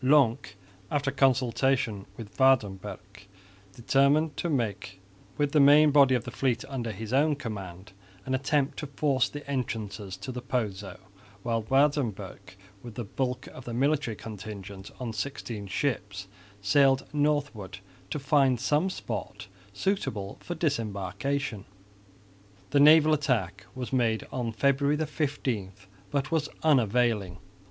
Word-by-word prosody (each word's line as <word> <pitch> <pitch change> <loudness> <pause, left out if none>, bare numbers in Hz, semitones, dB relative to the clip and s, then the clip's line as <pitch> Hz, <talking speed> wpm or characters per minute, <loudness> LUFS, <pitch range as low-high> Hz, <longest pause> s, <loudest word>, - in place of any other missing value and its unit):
Lonck, 130 -5 +3 0.3
after 145 -2 0
consultation 130 -5 +1
with 105 -3 -10
Waerdenburgh, 105 -5 +1 0.5
determined 140 +5 +2
to 175 - -2
make 100 - -2 0.4
with 145 -1 +1
the 150 - +4
main 145 +2 +7
body 140 -2 +6
of 120 - -1
the - - -7
fleet 125 -2 -1
under 125 -5 -3
his 110 +3 -6
own 150 +3 +3
command 95 -7 -7 0.3
an 130 - -2
attempt 135 +1 0
to 150 - -4
force 140 -2 +1
the 145 -1 -8
entrances 110 -7 -4
to 100 +6 -6
the 125 0 -5
Pozo, 105 -7 -3 0.5
while 115 -1 0
Waerdenburgh, 110 -8 0 0.3
with 120 -3 -10
the 120 - -3
bulk 125 +4 -3
of 130 - -12
the 120 - -5
military 140 -3 +1
contingent 100 -2 -8
on 120 -3 -4
sixteen 110 -3 -5
ships, 100 -5 -2 0.4
sailed 135 +3 +4
northwards 145 -10 -1 0.3
to - - -2
find 135 -3 +3
some 150 +8 +1
spot 115 - -5 0.3
suitable 105 - -2
for 175 - -6
disembarkation. 115 - -2 1.1
The 145 - +4
naval 155 +1 +7
attack 120 - -1
was 130 0 -5
made 115 -4 +1
on 120 -3 -2
February 140 +5 +2
15, 135 -10 -2 0.4
but 145 +1 -1
was 160 -2 0
unavailing. 115 - +2
125 Hz, 130 wpm, -28 LUFS, 105-140 Hz, 1.1 s, main